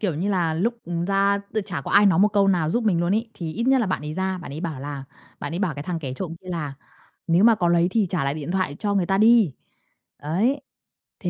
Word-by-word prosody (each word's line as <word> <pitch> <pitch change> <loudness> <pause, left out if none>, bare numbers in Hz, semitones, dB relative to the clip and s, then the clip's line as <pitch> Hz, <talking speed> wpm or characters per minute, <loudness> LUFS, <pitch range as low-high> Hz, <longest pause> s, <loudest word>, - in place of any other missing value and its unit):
kiểu 185 -7 -1
như 185 +7 -1
là, 170 -5 +1
lúc, 215 +9 0
ừm, 170 0 -3
ra 200 +1 +2
tự 215 - 0
chả 190 -8 -5
có - - -7
ai 205 +1 +6
nói 175 -4 +4
một 205 +2 +5
câu 200 -1 +2
nào 170 -5 +1
giúp 235 +5 0
mình 185 -6 +2
luôn 175 +4 +1
ấy, 225 +1 -2
thì 165 -3 -5
ít 230 +7 -2
nhất 265 0 +4
là 230 - 0
bạn 185 -5 -2
ấy 150 +1 -5
ra, 190 0 -2
bạn 170 -5 -8
ấy 150 - -6
bảo 160 -6 -4
là 140 -1 -6 0.4
bạn 145 - -5
ấy 170 - -3
bảo 185 -6 -1
cái 145 - -6
thằng 170 +2 -3
kẻ 135 -5 -5
trộm 165 +2 -5
kia 185 - -14
là 150 -5 -4 0.5
"Nếu 170 +4 +3
mà 230 0 +7
có 175 -5 0
lấy 170 0 +3
thì 215 0 +1
trả 175 -7 -1
lại 140 +1 -1
điện 155 +1 -5
thoại 185 -6 -1
cho 205 -1 -1
người 190 -3 +1
ta 195 +1 +1
đi." 220 -6 +5 0.7
Đấy, 205 - 0 0.6
thế 180 - -2
180 Hz, 280 wpm, -23 LUFS, 160-200 Hz, 0.7 s, mà